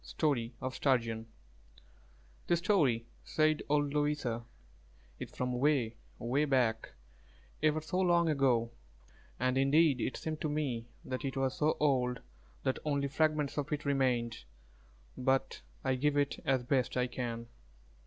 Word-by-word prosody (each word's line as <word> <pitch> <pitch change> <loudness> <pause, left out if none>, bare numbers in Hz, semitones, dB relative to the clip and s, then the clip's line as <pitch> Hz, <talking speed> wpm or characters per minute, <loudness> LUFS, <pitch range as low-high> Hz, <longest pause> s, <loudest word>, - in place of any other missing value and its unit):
STORY 125 -6 -1
OF 130 +1 -3
STURGEON 115 -5 0 1.2
"This 175 - +3
story," 155 - +2 0.2
said 155 0 +2
old 145 -1 +2
Louisa, 145 -6 0 0.8
"is - - -5
from 125 0 -3
'way, 130 -5 +2 0.2
'way 130 +6 +1
back, 120 -5 +1 0.7
ever 155 0 +2
so 160 +4 -2
long 175 -2 +4
ago;" 130 -6 +2 0.7
and 130 +1 +1
indeed 140 -1 +4
it - - -2
seemed 155 -1 -4
to 155 - 0
me 135 -6 -2 0.2
that 130 +2 -4
it 135 -1 -3
was 135 -1 0
so 155 +1 +1
old 125 -4 +1 0.4
that 130 - 0
only 140 -2 0
fragments 150 0 +1
of 145 +1 -4
it 150 0 -2
remained; 125 - 0 0.7
but 135 +1 0 0.2
I 130 - +1
give 145 +3 +1
it 145 -1 0
as 130 -2 +2
best 130 -1 0
I 125 - +2
can. 120 -2 -4
135 Hz, 140 wpm, -32 LUFS, 125-150 Hz, 1.2 s, long